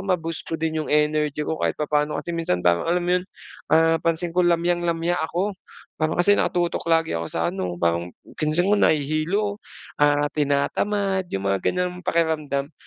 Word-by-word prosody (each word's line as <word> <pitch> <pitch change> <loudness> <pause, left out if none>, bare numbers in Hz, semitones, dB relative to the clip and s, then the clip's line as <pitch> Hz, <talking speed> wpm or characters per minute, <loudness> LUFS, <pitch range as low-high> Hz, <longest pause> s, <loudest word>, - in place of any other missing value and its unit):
ma-boost 170 -4 -2
ko 165 - -2
din 160 0 -1
yung - - -8
energy 150 0 +1
ko 160 - -3
kahit - - 0
papano, 150 0 0
kasi 170 - -5
minsan 160 - -1
parang 85 - +2
alam 175 +1 +1
mo 175 - -1
yun, - - -11 0.4
ah, 165 +1 +4
pansin 165 +1 -1
ko 180 - +2
lamyang-lamya 175 0 +1
ako, 180 +6 -1 0.5
parang 155 +1 0
kasi 180 +4 +4
nakatutok 175 -1 0
lagi 165 0 +2
ako 85 0 -2
sa, 85 0 -1
ano, 90 -2 -3
parang 85 0 0 0.3
paggising 155 +3 +2
ko - - +5
nahihilo, 160 +8 +1 0.4
ah, 145 0 +3
tinatamad 190 +7 0
yung 95 - -4
mga 100 -1 +1
ganyang 180 0 -1
pakiramdam. 155 -4 0
160 Hz, 170 wpm, -23 LUFS, 150-175 Hz, 0.5 s, ko